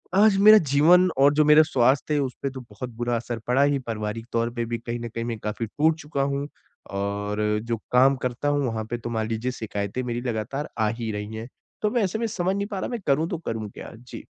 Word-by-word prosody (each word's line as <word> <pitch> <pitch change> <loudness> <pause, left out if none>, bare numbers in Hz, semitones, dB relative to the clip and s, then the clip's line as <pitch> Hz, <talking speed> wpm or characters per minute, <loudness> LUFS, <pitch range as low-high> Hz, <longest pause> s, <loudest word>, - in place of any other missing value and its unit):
आज 205 -1 +5
मेरा 215 0 +11 0.2
जीवन 180 +5 +6
और 140 +2 +5
जो 150 0 +3
मेरा 150 +1 +7
स्वास्थ्य 135 +1 +2
है, 145 - +2
उसपे 135 0 -3
तो 130 -1 -8
बहुत 115 +4 -7
बुरा 120 0 0
असर 115 0 -4
पड़ा 130 +3 +3
ही, 145 -1 +2
पारिवारिक 115 -1 -4
तौर 115 0 +1
पे 120 -1 -2
भी 115 0 -3
कहीं 115 +1 -5
ना 120 - -5
कहीं 115 0 -5
मैं 115 -2 -3
काफ़ी 110 +2 -3
टूट 155 +8 +1
चुका 145 -2 -3
हूँ, 140 +1 -2 0.4
और 100 +2 -2 0.2
जो 115 -1 -2
काम 130 +2 +5
करता 125 +4 -2
हूँ, 145 -1 +1
वहाँ 110 -1 -3
पे 120 - -2
तो 120 0 -6
मान 110 -1 -1
लीजिए 115 +3 -2
शिकायतें 105 0 -4
मेरी 120 0 -3
लगातार 125 +4 -3
आ 110 - +3
ही 110 -1 -2
रही 105 +1 -5
हैं। 110 +2 -6 0.3
तो 210 - +2
मैं 240 -4 +1
ऐसे 195 +4 -1
में 230 - 0
समझ 190 -3 -1
नहीं 200 0 -2
पा 200 -3 -4
रहा, - - -3
मैं 240 -2 -3
करूँ 150 +4 +2
तो 175 - -2
करूँ 110 -2 -3
क्या? - - -10
जी। 120 +2 -11
125 Hz, 240 wpm, -25 LUFS, 115-145 Hz, 0.4 s, मेरा